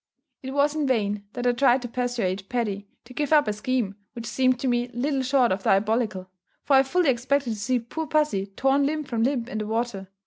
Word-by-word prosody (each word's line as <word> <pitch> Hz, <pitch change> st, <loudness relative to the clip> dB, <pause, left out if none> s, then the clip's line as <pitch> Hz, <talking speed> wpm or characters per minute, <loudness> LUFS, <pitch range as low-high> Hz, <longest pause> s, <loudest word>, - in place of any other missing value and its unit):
It 265 Hz, -, -6 dB
was 290 Hz, +1 st, +3 dB
in 305 Hz, -2 st, -1 dB
vain 210 Hz, -5 st, 0 dB
that 245 Hz, -, -4 dB
I 245 Hz, -, +5 dB
tried 250 Hz, 0 st, +3 dB
to -, -, -3 dB
persuade 230 Hz, -6 st, -2 dB
Paddy 205 Hz, -5 st, -2 dB, 0.2 s
to 250 Hz, -, -13 dB
give 295 Hz, +3 st, -2 dB
up 300 Hz, -4 st, +5 dB
a 210 Hz, -, 0 dB
scheme 235 Hz, -2 st, -1 dB, 0.2 s
which 235 Hz, -2 st, -7 dB
seemed 255 Hz, +2 st, +1 dB
to 270 Hz, -, -1 dB
me 240 Hz, 0 st, +1 dB
little 270 Hz, +2 st, 0 dB
short 260 Hz, -2 st, +2 dB
of 190 Hz, +1 st, -1 dB
diabolical; 200 Hz, -1 st, +1 dB, 0.4 s
for 280 Hz, -, +3 dB
I -, -, +7 dB
fully 315 Hz, +4 st, +1 dB
expected 260 Hz, +1 st, 0 dB
to -, -, -2 dB
see 235 Hz, +5 st, 0 dB
poor 275 Hz, +7 st, -5 dB
pussy 295 Hz, -12 st, +1 dB
torn 270 Hz, +7 st, +1 dB
limb 305 Hz, +1 st, -2 dB
from 235 Hz, -5 st, -3 dB
limb 245 Hz, -1 st, 0 dB
in 215 Hz, -, -4 dB
the 215 Hz, -, -4 dB
water. 220 Hz, -3 st, -2 dB
245 Hz, 220 wpm, -25 LUFS, 215-270 Hz, 0.4 s, I